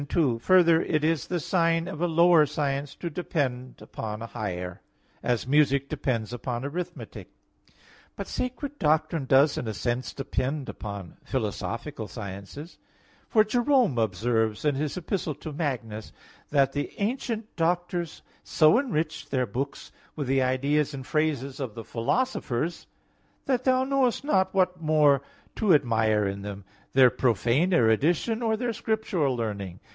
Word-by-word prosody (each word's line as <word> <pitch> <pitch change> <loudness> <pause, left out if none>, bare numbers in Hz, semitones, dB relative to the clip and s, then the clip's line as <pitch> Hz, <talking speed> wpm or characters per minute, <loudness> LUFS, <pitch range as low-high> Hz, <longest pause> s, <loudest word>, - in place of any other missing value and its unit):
2: 130 -9 +2
Further, 170 +2 +5
it 155 -1 0
is 160 -3 +1
the 180 - -1
sign 165 0 +1
of 170 -4 -6
a 175 - +2
lower 170 -2 +5
science 140 -1 -2
to 175 - -5
depend 135 -7 -3
upon 105 -1 -6
a 115 - -5
higher; 90 -6 -5 0.4
as 120 -2 0
music 140 0 +3
depends 115 -4 -2
on 120 +1 -4
arithmetic. 170 +5 -6 0.9
But - - -5
sacred 270 +3 -4
doctrine 155 -1 +1
does 135 +3 +4
in 120 - -4
a 110 - -3
sense 120 +4 -2
depend 135 +1 -3
upon 100 -3 -7
philosophical 115 +1 -3
sciences; 100 - -8 0.5
for 215 - +5
Jerome 240 - +2
observes, 110 +1 0
in 150 - +3
his 145 +4 -2
Epistle 170 -3 -2
to 155 - -8
Magnus, 120 -8 -3 0.4
that 140 -2 +3
"the 145 +1 -3
ancient 225 0 -3
doctors 175 0 -1 0.2
so 155 +8 +4
enriched 155 - -2
their 130 -2 +1
books 130 +6 -5 0.2
with 145 - -3
the 135 +1 +2
ideas 140 +3 +1
and 135 -1 -7
phrases 145 -4 -1
of 130 -6 -4
the 115 - -6
philosophers, 155 - -1 0.6
that 255 -2 0
thou 260 0 +4
knowest 265 -2 +1
not 190 -11 +2
what 185 -2 +1
more 150 -3 +4 0.4
to 205 -7 +5
admire 110 -6 +2
in 100 0 -3
them, 100 -1 -7 0.3
their 130 -2 +7
profane 125 - +2
erudition 165 - +2
or 220 -2 +1
their 240 0 -1
scriptural 200 - 0
learning." 100 -6 -4
145 Hz, 145 wpm, -27 LUFS, 120-175 Hz, 0.9 s, their